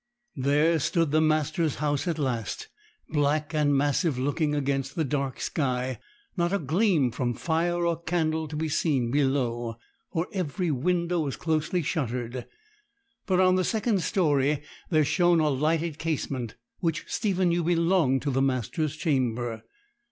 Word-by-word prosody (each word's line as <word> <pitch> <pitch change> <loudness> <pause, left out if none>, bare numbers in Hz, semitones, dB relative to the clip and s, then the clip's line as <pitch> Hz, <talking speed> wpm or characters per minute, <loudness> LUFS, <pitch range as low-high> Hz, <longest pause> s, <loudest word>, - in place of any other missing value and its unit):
There 150 +5 +2
stood 165 +1 +1
the 155 +1 +4
master's 155 0 +1
house 145 +1 -1
at 165 -2 0
last, 135 - -3 0.4
black 150 +1 0
and 145 -2 +3
massive 145 +1 +1
looking 145 +3 0
against 135 -1 -1
the 160 - +1
dark 140 -2 -2
sky; 130 -3 -1 0.4
not 175 -2 +1
a 200 - +2
gleam 160 - +2
from 120 0 -2
fire 170 +1 0
or 170 -1 0
candle 160 -2 0
to 150 - -7
be 160 +1 -1
seen 140 -6 +1
below, 125 -4 0 0.4
for 165 +2 -1
every 180 -2 -1
window 170 +5 0
was 145 -4 -2
closely 160 +2 0
shuttered; 125 -5 -3 0.8
but 185 -2 +2
on 185 0 +5
the 185 - +2
second 215 0 +1
storey 150 -5 +1 0.3
there 155 -3 +3
shone 175 +2 +3
a 155 -1 +3
lighted 155 +3 0
casement, 140 -7 -3 0.2
which 165 -2 -1
Stephen 190 -4 +1
knew 170 0 +1
belonged 170 -5 +2
to 145 - 0
the 135 +1 +1
master's 135 - -1
chamber. 120 -7 -1
155 Hz, 150 wpm, -27 LUFS, 135-170 Hz, 0.8 s, on